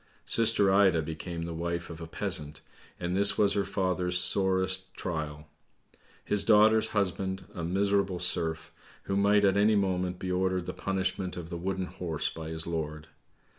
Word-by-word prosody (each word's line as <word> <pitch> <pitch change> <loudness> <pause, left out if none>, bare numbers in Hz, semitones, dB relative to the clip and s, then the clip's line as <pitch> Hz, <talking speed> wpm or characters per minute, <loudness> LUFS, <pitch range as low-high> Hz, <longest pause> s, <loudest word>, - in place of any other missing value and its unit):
Sister 110 -4 +3
Ida 95 -5 +4
became 80 +2 -5
the 85 0 -5
wife 85 +1 -4
of 80 0 -9
a 80 - -6
peasant, 80 -5 -2 0.4
and 90 +1 -2
this 100 +1 +4
was 100 -1 +3
her 100 - +1
father's 90 -2 -1
sorest 95 0 +2
trial. 75 -3 -5 0.8
His 105 -1 0
daughter's 110 0 +5
husband 95 -1 -2
a 85 - -5
miserable 100 +1 +1
serf, 80 -2 -1 0.3
who 95 - -2
might 100 +1 +4
at 100 0 +3
any 105 +1 +4
moment 90 -2 0
be 90 0 -4
ordered 90 -1 0
the - - -5
punishment 95 -1 -2
of 85 -1 -7
the - - -4
wooden 95 +1 -2
horse 85 -4 -2
by 80 -1 -7
his 80 0 -2
lord. 80 -2 -4
95 Hz, 165 wpm, -29 LUFS, 85-100 Hz, 0.8 s, daughter's